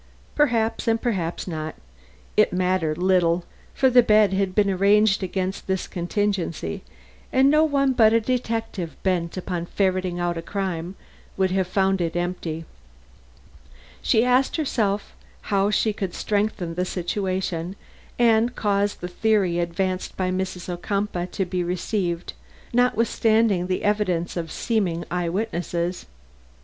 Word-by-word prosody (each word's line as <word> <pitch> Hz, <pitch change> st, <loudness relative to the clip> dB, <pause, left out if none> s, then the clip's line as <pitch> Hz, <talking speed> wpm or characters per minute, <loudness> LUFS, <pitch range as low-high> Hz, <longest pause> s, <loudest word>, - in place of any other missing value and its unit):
Perhaps, 230 Hz, -7 st, +1 dB
and 225 Hz, 0 st, +3 dB
perhaps 190 Hz, -10 st, -2 dB
not, 155 Hz, -2 st, -4 dB, 0.6 s
it -, -, +4 dB
mattered 180 Hz, -4 st, 0 dB
little, 180 Hz, -1 st, +2 dB, 0.3 s
for 265 Hz, -, +4 dB
the 250 Hz, -1 st, +7 dB
bed 215 Hz, -3 st, +4 dB
had 190 Hz, -1 st, 0 dB
been 210 Hz, -1 st, +4 dB
arranged 200 Hz, +2 st, +3 dB
against 190 Hz, +1 st, -3 dB
this 190 Hz, -1 st, -1 dB
contingency 175 Hz, -, -2 dB, 0.5 s
and 265 Hz, +2 st, +5 dB
no 305 Hz, +1 st, +5 dB
one 275 Hz, -3 st, +2 dB
but 220 Hz, -3 st, +5 dB
a 230 Hz, -, +4 dB
detective 225 Hz, -7 st, -2 dB
bent 180 Hz, -2 st, 0 dB
upon 175 Hz, -2 st, -3 dB
ferreting 185 Hz, -2 st, 0 dB
out 175 Hz, -1 st, -1 dB
crime 185 Hz, -2 st, -3 dB, 0.4 s
would 190 Hz, -1 st, +2 dB
have 190 Hz, -1 st, +1 dB
found 190 Hz, 0 st, +1 dB
it 170 Hz, -1 st, -1 dB
empty) 175 Hz, -2 st, -3 dB, 1.4 s
she 225 Hz, +2 st, +3 dB
asked 250 Hz, +2 st, +3 dB
herself 215 Hz, -10 st, -1 dB, 0.4 s
how 200 Hz, 0 st, +3 dB
she 215 Hz, 0 st, +1 dB
could 195 Hz, -3 st, -4 dB
strengthen 205 Hz, -5 st, -1 dB
the 180 Hz, +2 st, -1 dB
situation 185 Hz, -1 st, -2 dB, 0.4 s
and 235 Hz, 0 st, +3 dB
cause 205 Hz, -1 st, +1 dB
the 180 Hz, -, -6 dB
theory 190 Hz, -2 st, +1 dB
advanced 185 Hz, +2 st, -2 dB
by 185 Hz, -1 st, 0 dB
Mrs. 185 Hz, -1 st, -3 dB
Ocumpaugh 180 Hz, 0 st, -2 dB
to 190 Hz, -, -2 dB
be 180 Hz, 0 st, -2 dB
received, 180 Hz, 0 st, -2 dB, 0.4 s
notwithstanding 225 Hz, -5 st, +2 dB
the 185 Hz, -, -1 dB
evidence 185 Hz, -5 st, 0 dB
of 165 Hz, -2 st, -4 dB
seeming 180 Hz, -8 st, -1 dB
eye 175 Hz, -1 st, -1 dB
witnesses. 175 Hz, -3 st, -2 dB
190 Hz, 135 wpm, -24 LUFS, 175-215 Hz, 1.4 s, the